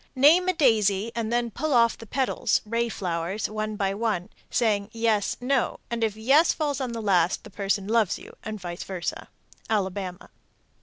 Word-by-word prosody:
Name 310 +8 +6
a - - +3
daisy, 220 - +2
and 230 -1 -2
then 240 -1 0
pull 310 +7 -2
off 235 -1 +4
the 225 - -12
petals 255 -2 +1
(ray 230 +2 0
flowers) 180 0 -2
one 215 0 -3
by 195 -2 0
one, 205 -4 -1 0.2
saying 205 -4 +1
"yes, 225 -3 +1
no," 255 0 0
and 235 -1 -1
if 215 -2 0
"yes" 275 +9 +4
falls 290 -3 -2
on 250 -3 -3
the 230 -1 -4
last, 180 -4 +2
the - - -12
person 200 0 -1
loves 220 -3 +2
you, - - -13
and 215 -1 -5
vice 175 -1 -6
versa. 185 -3 -5 0.4
_Alabama. 190 -3 -2
220 Hz, 175 wpm, -26 LUFS, 195-235 Hz, 0.4 s, Name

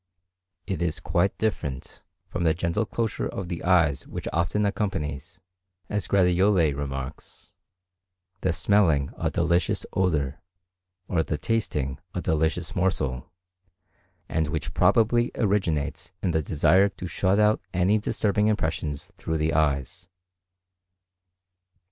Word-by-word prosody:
It 95 -4 -3
is 85 -3 0
quite 90 +3 0
different 75 -12 -3 0.3
from 90 - -3
the 80 -1 +3
gentle 90 +6 -1
closure 115 -2 -2
of 95 -3 -5
the 85 -3 -4
eyes 85 -7 +3
which - - -6
often 85 +5 +1
accompanies, 85 -5 -3 0.5
as 105 -2 -1
Gratiolet 90 -4 +3
remarks, 70 0 -6 0.9
the 95 - +1
smelling 85 -4 +2
a - - -1
delicious 85 +1 +1
odour, 75 -7 0 0.7
or 85 -3 +1
the 80 -1 -2
tasting 75 - -1 0.2
a - - 0
delicious 80 +3 0
morsel, 80 -8 -1 1.0
and 80 -1 0
which 75 -2 -3
probably 120 +2 +3
originates 85 -6 -1
in 90 - +1
the 80 -1 +1
desire 90 +7 +3
to 95 - -9
shut 95 +3 +1
out 105 0 +3
any 95 +4 +2
disturbing 105 0 +1
impression 80 -7 0
through 80 +3 -5
the 80 0 0
eyes. 75 +3 0
85 Hz, 120 wpm, -26 LUFS, 75-95 Hz, 1.0 s, the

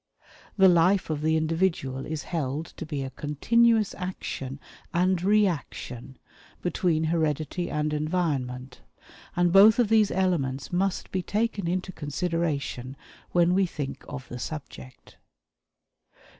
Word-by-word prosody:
The 190 -1 +7
life 180 +1 +4
of 150 -1 -2
the 160 +1 +2
individual 160 -5 -1
is 155 -1 -4
held 150 -2 -3
to 165 - -9
be 145 -3 -3
a 130 - -5
continuous 220 - +2
action 140 -7 -5 0.4
and 180 0 +2
reaction 170 - 0 0.5
between 175 -2 +1
heredity 160 +1 -1
and 150 0 -1
environment, 140 -6 -2 0.5
and 175 -1 +2
both 205 +3 +8
of 240 -4 +3
these 220 -2 +4
elements 165 -7 -1
must 190 +1 -1
be 190 - -1
taken 210 -1 -1
into 185 +2 -2
consideration 145 -5 -3 0.3
when 175 0 +3
we 190 0 +3
think 145 -5 -5
of 135 -3 -7
the 125 - -7
subject. 135 -2 -8
165 Hz, 125 wpm, -26 LUFS, 145-185 Hz, 0.5 s, both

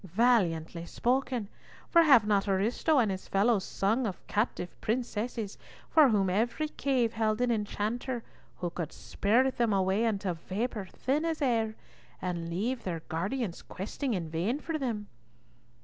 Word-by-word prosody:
"Valiantly 180 -5 +2
spoken, 245 +3 0 0.4
for 335 - +6
have 270 -9 +7
not 205 -1 +2
Ariosto 220 +10 +2
and 225 -6 +3
his 190 0 -5
fellows 200 0 +2
sung 220 +7 0
of 190 - -6
captive 205 -4 -1
princesses 225 -2 -2 0.3
for 305 -4 +7
whom 200 -4 +2
every 235 +11 0
cave 255 -6 0
held 220 -1 +1
an 245 -1 +2
enchanter 225 +3 -2 0.3
who 175 -1 -3
could 170 -3 -4
spirit 250 +6 +1
them 235 -3 +2
away 195 +3 +2
into 200 -4 0
vapour 195 +5 -3
thin 275 +10 -1
as 325 -1 -1
air, 225 -6 +1 0.4
and 170 -2 -3
leave 230 +8 -2
their 170 -3 -3
guardians 190 +4 -2
questing 225 +6 -3
in 170 -3 -3
vain 175 - -1
for 315 0 -3
them?" 225 -6 -2
220 Hz, 150 wpm, -30 LUFS, 190-245 Hz, 0.4 s, have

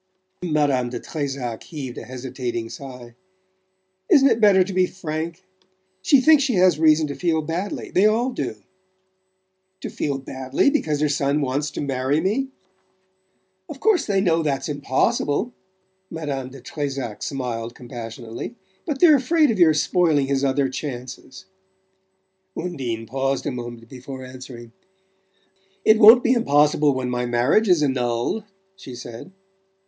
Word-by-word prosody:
Madame 145 -7 +1
de 125 - -5
Trezac 135 -6 -4
heaved 140 -7 -7
a - - -8
hesitating 125 -2 -5
sigh. 125 -4 -10 1.0
"Isn't 275 -2 +6
it 225 - +1
better 200 -3 +6
to 190 +1 -6
be 185 0 +3
frank? 165 0 -5 0.6
She 265 +9 +5
thinks 310 +1 +6
she 260 -4 +1
has 180 -4 +4
reason 155 -1 +4
to 145 - -4
feel 160 -1 0
badly 175 +6 -4
they 195 +3 +4
all 235 +4 +1
do." - - -4 1.3
"To - - -6
feel 140 -2 -2
badly? 130 - 0
Because 155 - 0
her 155 - +3
son 140 0 0
wants 140 +1 -1
to - - -6
marry 135 +1 0
me?" 240 +10 -1 1.2
"Of 285 - -8
course 425 0 +2
they 195 -2 +2
know 165 -4 +2
that's 140 -4 -1
impossible." 145 - 0 0.6
Madame 140 -5 -4
de 135 0 -12
Trezac 135 -7 -5
smiled 120 -4 -4
compassionately. 120 - -8 0.3
"But 290 -4 -3
they're 315 -5 +7
afraid 300 +2 +2
of 215 - -3
your 160 -3 +6
spoiling 155 -3 +2
his 135 0 -1
other 135 0 +1
chances." 130 +3 -7 1.1
Undine 130 -10 -4
paused 135 +3 -2
a - - -1
moment 120 -2 -7
before 130 +1 -9
answering, 130 -2 -11 1.1
"It 220 0 +6
won't 225 +3 +9
be 245 - +3
impossible 150 - +3
when 125 -1 -2
my 125 0 -1
marriage 125 - +2
is 170 -4 +4
annulled," 125 - -1 0.3
she 135 -10 -10
said. 120 +6 -9
145 Hz, 145 wpm, -22 LUFS, 130-185 Hz, 1.3 s, won't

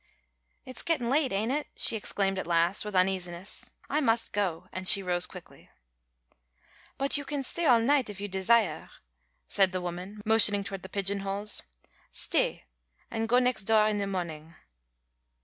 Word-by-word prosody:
"It's 255 - -6
getting 260 -8 -1
late, 280 -1 +2
ain't 215 +5 -1
it?" 295 +2 -2
she - - +1
exclaimed 195 -2 -1
at 190 - -5
last, 170 +3 +3
with 210 -2 -6
uneasiness. 185 0 -1 0.2
"I 300 +2 0
must 225 -4 0
go," 185 -4 -2
and 185 0 -4
she 195 - +7
rose 180 -1 0
quickly. - - -14 1.3
"But 275 +1 +3
you 285 - -3
can 285 0 -4
stay 335 +5 -1
all 240 -3 +6
night 260 0 +2
if 200 -2 -8
you 205 - -4
desiah," 190 -3 +1 0.6
said 195 -2 +3
the 185 - -1
woman, 180 +4 -7
motioning 210 -2 +4
toward 195 -1 -6
the 190 - -10
pigeon 200 0 -1
holes. 200 +2 -1 0.5
"Stay, - - 0 0.5
and 225 0 -3
go 245 - +4
nex' 250 -4 +2
doah 215 +1 +3
in 205 - -2
the 200 - -2
morning." 165 -4 -5
200 Hz, 165 wpm, -28 LUFS, 185-230 Hz, 1.3 s, she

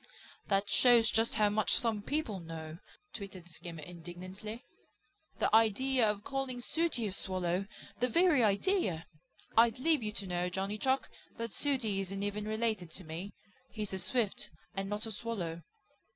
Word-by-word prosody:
"That 200 0 +2
shows 235 +1 +6
just 225 +1 +2
how 210 -2 +4
much 210 -2 +2
some 225 -4 +1
people 235 -5 -2
know!" 160 -1 -7 0.3
twittered 195 -4 -7
Skimmer 165 -1 -8
indignantly. 180 - -8 0.7
"The - - +3
idea 225 +2 +4
of 205 -1 -2
calling 270 -1 -3
Sooty 315 -2 0
a 205 - -1
Swallow! 185 0 -1 0.3
The 250 - +3
very 330 -1 +4
idea! 200 - +1 0.5
I'd 230 0 +5
leave 310 +2 +3
you 215 -1 -2
to 200 - -3
know, 180 -1 -1
Johnny 195 +3 -2
Chuck, 265 +3 +1 0.3
that 230 0 -4
Sooty 250 -9 +1
isn't 195 +1 -3
even 205 +1 -2
related 220 -5 0
to 190 - -3
me. 170 +5 -6 0.3
He's 210 -3 -4
a 190 - -1
Swift, 235 -2 0 0.3
and 195 0 -2
not 210 +2 -2
a 225 - -5
Swallow." 195 -7 -3
210 Hz, 155 wpm, -33 LUFS, 185-235 Hz, 0.7 s, shows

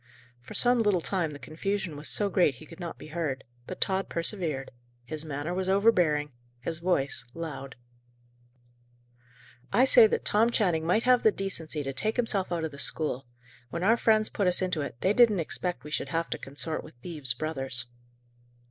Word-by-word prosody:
For 120 - -10
some 245 -1 +4
little 205 -4 +3
time 175 -2 -1
the 145 - -8
confusion 180 +3 -3
was 150 +1 -7
so 205 - 0
great 175 -8 +3
he 130 - -12
could 155 - -13
not 170 -2 -6
be - - -11
heard, 150 -5 -2 0.2
but 185 - -6
Tod 190 0 +1
persevered; 165 -6 -2 0.3
his 155 +3 -5
manner 150 +2 -3
was 190 +1 -1
overbearing, 175 -8 +3 0.3
his 160 +6 -4
voice 140 -8 0
loud. 150 -5 -6 2.0
"I 255 - +5
say 240 -4 +8
that - - -2
Tom 220 +3 +4
Channing 175 -9 +1
might 215 +6 +3
have 250 -1 +5
the 220 - +5
decency 165 -7 -4
to 135 0 -3
take 215 +11 -1
himself 215 -7 0
out 170 -2 -1
of 160 - -2
the 140 - -10
school. 135 -4 -1 0.4
When 170 +5 -4
our 220 +4 +5
friends 220 -2 +4
put 200 - 0
us 180 - +4
into 180 -4 0
it, 140 -4 -6
they 190 - +3
didn't 220 -4 +5
expect 170 -3 -2
we 150 - -9
should 140 - -2
have 165 +3 -1
to - - -2
consort 145 +3 -4
with 155 - -13
thieves' 135 -2 -2
brothers." 135 -3 -3
170 Hz, 185 wpm, -28 LUFS, 150-195 Hz, 2.0 s, say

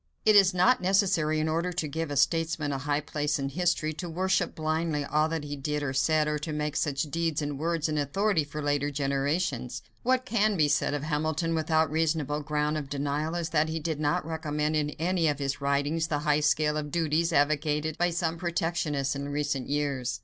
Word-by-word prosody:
It 215 -1 +6
is 195 -2 +7
not 185 +6 +3
necessary, 180 -5 +2
in 155 - 0
order 165 +3 0
to 175 -3 -2
give 160 +2 -3
a 145 - -3
statesman 165 -1 +1
a 135 - -2
high 145 +2 0
place 150 0 -1
in 135 -1 -2
history, 155 0 0
to 175 +3 -6
worship 185 +1 0
blindly 155 -1 -1
all 155 +2 +1
that 165 -2 -3
he 145 0 -5
did 150 +1 -2
or 130 -2 -2
said 155 +3 +2
or 150 0 -1
to 155 +1 -5
make 150 0 -2
such 140 -3 0
deeds 165 0 -1
and 145 -2 -3
words 165 0 0
an 155 -1 -1
authority 170 +4 +1
for 150 +1 -6
later 145 0 +1
generations. 140 -1 -1 0.2
What 255 +1 +1
can 215 -4 +1
be 150 -2 +4
said 145 0 +1
of 145 - -3
Hamilton 155 +2 -1
without 160 -1 +1
reasonable 155 -2 0
ground 150 +1 -1
of 140 -2 -8
denial 145 +3 -2
is 170 -1 -2
that 155 0 +2
he 160 +1 -2
did 155 -1 -3
not 145 0 0
recommend 155 -1 -2
in 150 -1 +1
any 170 0 +1
of 145 -2 +1
his 140 -1 -3
writings 145 +3 0
the 150 - 0
high 150 0 +3
scale 150 0 +2
of 150 -1 -3
duties 165 +1 +1
advocated 150 +1 +1
by 175 0 +3
some 165 -1 -2
protectionists 165 -5 -1
in 140 +1 -4
recent 145 -2 -2
years. 140 -4 -1
155 Hz, 210 wpm, -28 LUFS, 145-165 Hz, 0.2 s, is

